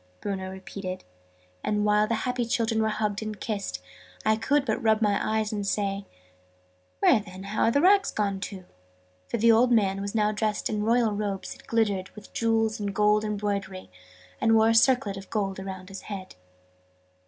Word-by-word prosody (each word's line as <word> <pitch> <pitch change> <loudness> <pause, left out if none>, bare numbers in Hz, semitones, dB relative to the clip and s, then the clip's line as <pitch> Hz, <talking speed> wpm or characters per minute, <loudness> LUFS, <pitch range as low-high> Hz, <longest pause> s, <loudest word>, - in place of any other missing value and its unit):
Bruno 190 -2 -4
repeated: 190 0 -7 0.6
and, 210 0 0
while 210 0 +3
the 230 - 0
happy 250 -1 0
children 225 -1 0
were 220 - +2
being 215 - -1
hugged 210 -1 -1
and 215 -2 -5
kissed, 200 - -4 0.4
I 220 - +4
could 275 +6 +1
but 220 0 -1
rub 220 -2 +3
my 205 -2 +2
eyes 220 0 0
and 205 -1 -2
say 200 0 -1 0.9
"Where, - - +5
then, 190 -1 -10
are 215 +2 +1
the 280 +5 +2
rags 390 +3 +5
gone 200 -2 -1
to?"; 190 -2 -7 0.6
for - - -2
the 230 +1 +5
old 240 +2 +4
man 195 -4 +2
was 200 +2 -4
now 210 -1 +2
dressed 215 0 -1
in 210 -1 -1
royal 230 +1 +2
robes 205 -2 -3
that - - -18
glittered 205 -5 0
with 210 -2 -13
jewels 225 -1 +1
and 200 -1 -3
gold 210 0 +3
embroidery, 200 - -3 0.5
and 225 0 +4
wore 220 0 +5
a - - +4
circlet 230 -3 +3
of 195 0 -10
gold 195 -3 -2
around 190 -1 -7
his 195 -1 -8
head. 195 -3 -7
210 Hz, 185 wpm, -27 LUFS, 195-225 Hz, 0.9 s, Where